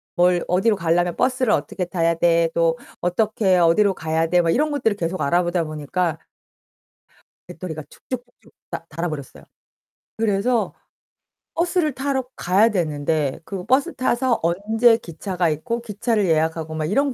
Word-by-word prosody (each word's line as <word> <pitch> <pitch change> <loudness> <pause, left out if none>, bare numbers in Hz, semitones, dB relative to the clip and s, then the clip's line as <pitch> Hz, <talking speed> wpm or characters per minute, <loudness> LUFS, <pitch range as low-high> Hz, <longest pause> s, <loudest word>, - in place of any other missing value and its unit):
'뭘 175 0 +3
어디로 190 +5 +2
가려면 175 -1 +1
버스를 255 -2 +1
어떻게 155 +5 -1
타야 170 -2 +1
돼? 170 0 +3
또 165 -1 +2 0.2
어떻게 190 +1 +2
어디로 180 +4 +4
가야 160 0 -1
돼?' 180 +1 +3
막 170 - 0
이런 300 - +2
것들을 225 -8 +1
계속 175 +1 -2
알아보다 175 +3 +1
보니까 155 +2 -2 1.3
배터리가 160 -2 -6
쭉쭉쭉쭉 245 -1 -9 0.2
다 165 - -5
닳아 165 +2 -3
버렸어요. 145 -4 -8 0.7
그래서 220 +2 +1 0.8
버스를 340 -3 +1
타러 265 0 -1
가야 195 +6 +3
되는데 155 -6 -1
그 195 -3 -5
버스 275 +9 +2
타서 255 -1 +1
언제 220 +7 +3
기차가 175 -1 -2
있고 195 +11 -2
기차를 220 -1 -1
예약하고 160 0 0
막 155 -1 -2
이런 270 - +1
180 Hz, 320 characters per minute, -22 LUFS, 165-230 Hz, 1.3 s, 어디로